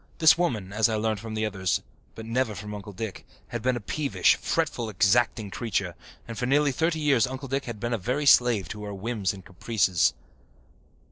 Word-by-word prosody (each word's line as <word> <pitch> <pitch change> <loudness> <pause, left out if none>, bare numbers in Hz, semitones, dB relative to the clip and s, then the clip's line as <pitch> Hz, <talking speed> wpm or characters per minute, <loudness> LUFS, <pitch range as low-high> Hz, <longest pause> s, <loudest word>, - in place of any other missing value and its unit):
This 160 -1 +7
woman, 110 - -1
as 110 +1 +3
I 110 - 0
learned 110 -1 -1
from 110 +1 -6
others, 100 -4 0 0.4
but 110 - -8
never 115 -1 -1
from 105 +1 -7
Uncle 105 0 -7
Dick, 100 0 -6 0.3
had 120 - -4
been 130 +2 +1
a - - -2
peevish, 140 +6 +2
fretful, 135 -8 -1
exacting 105 +1 +2
creature, 100 -6 -2 0.3
and 115 - -6
for 125 - -1
nearly 145 +1 +3
thirty 160 +4 0
years 140 -7 +3
Uncle 130 +2 -6
Dick 135 +1 -2
had 115 -3 -6
been 120 +2 -2
a 115 - -1
very 125 +9 -1
slave 120 - +5
to 105 -1 -6
her 100 -1 -5
whims 105 -1 -2
and 95 -2 -11
caprices. 95 -2 +1
115 Hz, 195 wpm, -26 LUFS, 105-130 Hz, 0.4 s, This